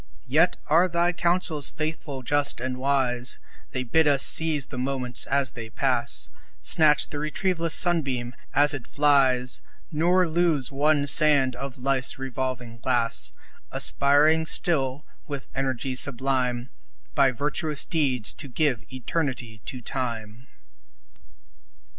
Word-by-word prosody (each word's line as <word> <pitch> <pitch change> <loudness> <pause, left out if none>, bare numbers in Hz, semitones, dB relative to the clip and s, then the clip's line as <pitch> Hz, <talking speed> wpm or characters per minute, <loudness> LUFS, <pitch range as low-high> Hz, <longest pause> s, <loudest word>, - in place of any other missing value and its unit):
Yet 155 +7 +2
are 165 +5 +3
thy 175 0 0
counsels 170 -4 0
faithful, 155 -3 -5
just, 145 +1 +2
and 130 +1 -4
wise; 130 -2 0 0.3
They 130 - -4
bid 160 +6 +1
us 140 -2 +4
seize 155 -4 +3
the 130 - -8
moments 125 -1 -3
as 135 0 +2
they 115 -3 -9
pass - - -1 0.3
Snatch 150 -2 +4
the 145 - -6
retrieveless 165 +2 -1
sunbeam 135 -9 +1 0.2
as 145 +1 +4
it 135 -5 -7
flies, 135 -4 +2 0.3
Nor 175 +3 +2
lose 160 -5 0
one 145 +1 +1
sand 145 -4 +3
of 135 0 -7
life's 130 0 0
revolving 130 -3 -5
glass 120 -1 -1 0.4
Aspiring 150 +3 +2
still, 140 -5 0 0.2
with 140 -2 -7
energy 130 -1 -3
sublime, 125 -1 0 0.4
By 135 - +4
virtuous 150 +3 +1
deeds 135 -8 0
to 145 - -6
give 130 -3 -1
eternity 125 -4 -4
to 130 -3 -6
Time. 115 -1 -5
135 Hz, 125 wpm, -24 LUFS, 125-155 Hz, 0.4 s, us